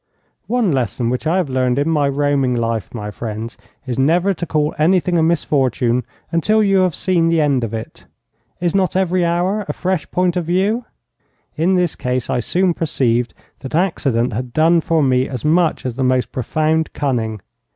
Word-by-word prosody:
One 235 -5 +1
lesson 125 -3 -1
which 125 +5 -2
I 170 +4 +2
have 180 -5 0
learned 130 -1 0
in 145 +2 +1
my 150 -3 +2
roaming 140 -2 +1
life, 115 -2 -2
my 105 -3 -6
friends, 110 +1 -6 0.3
is 130 -1 -3
never 175 +8 +3
to 175 -1 -5
call 150 -1 0
anything 180 +2 +2
a 165 - +3
misfortune 130 -7 +1 0.3
until 215 +6 +2
you 195 -1 +3
have 185 -3 +1
seen 170 -3 +1
the 165 -1 +2
end 140 -5 +2
of 115 - -3
it. 110 -1 -7 0.5
Is 175 -1 0
not 190 -3 +1
every 185 -1 +1
hour 180 +5 0
a - - -2
fresh 185 -3 -2
point 180 -1 +1
of 175 -2 -1
view? 200 +8 0 0.7
In 175 +4 +2
this 180 -3 +1
case 125 -1 -2
I 125 - +1
soon 180 +8 +1
perceived 125 -7 0 0.2
that 135 +3 -6
accident 135 - 0
had 125 +2 -4
done 165 +3 +4
for 160 -1 +1
me 130 0 +2
as 130 +1 -5
much 165 -1 +2
as 125 -1 -3
the 135 - 0
most 130 0 +1
profound 155 +4 0
cunning. 115 -6 -2
155 Hz, 185 wpm, -18 LUFS, 125-175 Hz, 0.7 s, done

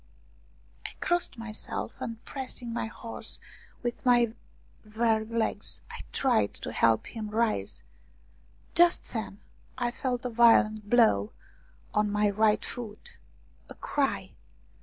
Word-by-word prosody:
I - - -5
crossed 350 -6 +1
myself, 225 -1 -4
and 230 -1 -5
pressing 250 -3 -5
my 235 - -2
horse 230 +1 -4 0.4
with 240 -1 -3
my 240 -2 +4 0.5
weary 220 0 +1
legs, 230 0 -2
I - - -7
tried 110 - +2
to - - -6
help 115 -1 +3
him 220 -2 -6
rise. 220 0 -1 0.9
Just 345 0 +4
then 220 -3 -4 0.4
I 240 -1 0
felt 250 -1 -2
a - - 0
violent 215 -2 +5
blow 220 - +4 0.6
on 210 -1 +2
my 210 0 +2
right 215 +1 +3
foot. 225 -4 -8 0.5
A - - -10
cry 290 - -1
230 Hz, 120 wpm, -29 LUFS, 215-245 Hz, 0.9 s, violent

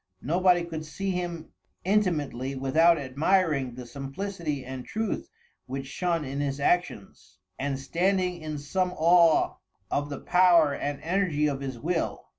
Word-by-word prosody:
Nobody 175 +3 +3
could 165 -2 -5
see 195 +5 -3
him 175 -3 -4 0.3
intimately 150 - 0
without 160 +6 +4
admiring 145 -1 +1
the 125 0 -8
simplicity 145 +3 -5
and 130 0 -6
truth 220 - -3 0.4
which 135 +1 -4
shone 170 +2 -1
in 135 +1 -4
his 140 -1 -2
actions, 160 - -1 0.2
and 140 0 -1
standing 180 +4 0
in 155 -1 -4
some 180 +6 -1
awe 170 0 +4 0.3
of 145 0 -1
the 140 - -5
power 175 -5 +5
and 145 0 -3
energy 170 -3 +1
of 140 -2 -1
his 130 -3 -4
will. 165 +6 -2
155 Hz, 140 wpm, -27 LUFS, 140-180 Hz, 0.4 s, power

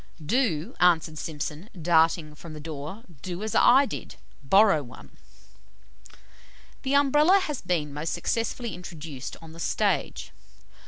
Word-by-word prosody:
"'Do!' 180 - 0
answered 160 -3 +3
Simpson, 155 +5 -5
darting 160 -1 +3
from 155 +2 -11
the 155 - -8
door, 155 +7 -7 0.2
'do 180 +4 -5
as 220 - -3
I 265 +3 +6
did - - -7 0.3
BORROW 195 +2 +5
ONE.'" 120 -4 -13 1.7
The 270 +1 0
Umbrella 295 +6 +5
has 300 -6 -4
been 165 -5 -1
most 150 +3 -3
successfully 230 +4 -2
introduced 165 -6 -8
on 160 - -11
the 165 - -12
stage. - - -1
170 Hz, 125 wpm, -26 LUFS, 155-220 Hz, 1.7 s, I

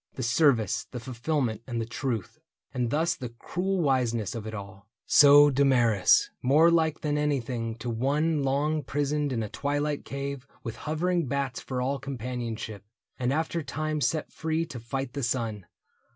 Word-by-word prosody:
The 130 - -4
service, 120 - +2
the 125 - -6
fulfillment, 120 -1 -2
and 120 -2 -3
the 115 - -1
truth. 115 -4 -4 0.3
And 125 -2 -1
thus 160 +6 +1
the 125 -3 -6
cruel 185 +4 -1
wiseness 120 -7 +1
of 110 -2 -6
it 110 - -6
all. 100 0 -10 0.2
So 145 0 +8
Damaris, 125 -7 +4
more 155 +6 +5
like 160 -2 +2
than 150 -1 0
anything 125 -6 -1
To 115 +1 -6
one 145 +6 +1
long 145 +3 +1
prisoned 145 0 -1
in 115 -3 -1
a - - -3
twilight 145 +3 -2
cave 140 -1 -5 0.2
With 115 -3 -5
hovering 170 +1 -1
bats 140 0 -2
for 125 -1 -3
all 135 +2 -1
companionship. 120 -5 -5 0.4
And 125 0 0
after 160 +3 -1
time 155 0 -3
set 155 +2 0
free 160 +1 -1
to 130 -7 -8
fight 130 +2 -4
the 140 - -3
sun. 115 -5 -2
135 Hz, 165 wpm, -27 LUFS, 115-150 Hz, 0.4 s, So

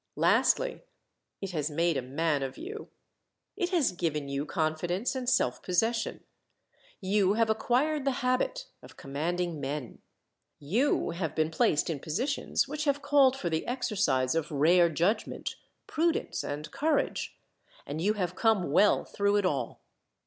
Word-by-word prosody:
Lastly, - - +2 0.6
it 195 -1 -4
has 155 -3 -1
made 165 +2 +1
a 135 - 0
man 145 +3 -1
of 135 -1 -4
you. 425 +6 -7 0.7
It 360 -4 -1
has 345 -7 +2
given 155 -5 -2
you 140 +2 -3
confidence 175 +6 -1
and 255 -2 -2
self 260 - +1
possession. 225 +6 0 0.8
You 195 0 +2
have 225 0 +2
acquired 265 +7 +1
the 265 -2 -1
habit 255 - 0 0.2
of - - -15
commanding 165 +4 -2
men. 140 -3 -5 0.6
You 205 - +1
have 170 -2 -3
been 155 0 +1
placed 155 -1 +2
in 160 -4 -2
positions 255 - -1
which 300 +2 -3
have 285 0 0
called 280 -2 +4
for 175 -9 -3
the 160 0 -1
exercise 200 - 0
of 165 -1 -1
rare 170 +4 +4
judgment, 175 +7 -1 0.3
prudence, 330 +1 -1
and 150 +1 -5
courage; 300 - -1 0.5
and 155 +3 -4
you 205 +4 +2
have 180 -4 -2
come 205 -7 +1
well 195 +6 +4
through 200 0 0
it 205 -2 +2
all. 150 -7 -2
185 Hz, 150 wpm, -29 LUFS, 155-255 Hz, 0.8 s, called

